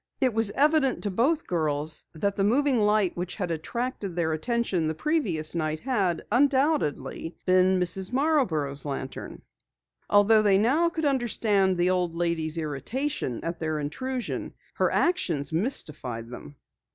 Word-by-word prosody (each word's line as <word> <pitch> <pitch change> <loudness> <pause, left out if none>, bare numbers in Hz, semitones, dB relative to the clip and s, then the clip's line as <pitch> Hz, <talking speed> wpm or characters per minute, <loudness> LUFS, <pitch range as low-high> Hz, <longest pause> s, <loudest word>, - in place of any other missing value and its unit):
It 255 -4 +2
was 225 -1 +1
evident 295 -2 +3
to 205 - -1
both 285 - +1
girls 155 -3 -1
that 200 +5 -1
the 195 - 0
moving 260 +4 +2
light 210 -2 +2
which 180 +1 -4
had 180 -5 -3
attracted 200 - -4
their 165 -2 0
attention 195 -2 -1
the 155 - -2
previous 185 - 0
night 155 -2 -2
had, 200 -10 0
undoubtedly, 265 - +1
been 185 0 +4
Mrs. 185 +2 -1
Marborough's 235 - +1
lantern. 135 -2 -6 0.7
Although 210 +2 +5
they 200 -2 +4
now 280 +11 +3
could 320 -2 -3
understand 215 -8 +1
the 175 +1 +2
old 180 -2 0
lady's 170 -2 -1
irritation 155 - -2
at 170 0 -4
their 155 -1 -2
intrusion, 245 - -4 0.2
her - - +1
actions 170 - 0
mystified 150 - -3
them. 145 +4 -10
190 Hz, 140 wpm, -26 LUFS, 160-250 Hz, 0.7 s, Although